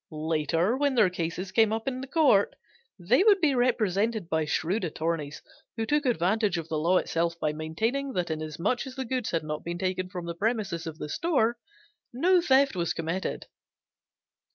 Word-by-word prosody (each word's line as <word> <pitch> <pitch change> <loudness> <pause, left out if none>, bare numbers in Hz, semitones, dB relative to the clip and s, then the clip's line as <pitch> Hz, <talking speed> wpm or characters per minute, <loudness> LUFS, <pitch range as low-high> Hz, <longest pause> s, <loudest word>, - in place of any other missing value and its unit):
Later 160 - 0
when 285 0 +1
their 210 -6 +4
cases 180 +2 -4
came 220 -2 +4
up 225 +2 -3
in 255 -1 -2
court 270 -9 +3 0.4
they 215 - +3
would 410 -2 +5
be 310 -6 +3
represented 220 -5 +1
by 160 -1 +1
shrewd 175 +7 -1
attorneys 160 -3 -3 0.3
who 225 - -1
took 295 +2 +1
advantage 210 -2 +1
of 165 -1 -5
the 155 - -1
law 175 +4 +3
itself 170 0 -1
by 150 -1 0
maintaining 225 - -2
that 175 -4 -1
inasmuch 160 - -2
as 260 - -9
the 265 - -4
goods 250 -1 -2
had 165 -2 -1
not 150 0 -5
been 170 +1 -4
taken 185 0 -2
from 180 -3 -6
the 170 - -4
premises 195 -4 -2
of 160 -1 -6
the 150 - -5
store, 240 - 0 0.5
no 350 +9 +3
theft 275 - +3
was 170 -2 -1
committed. 165 +4 -3
190 Hz, 175 wpm, -27 LUFS, 165-245 Hz, 0.5 s, would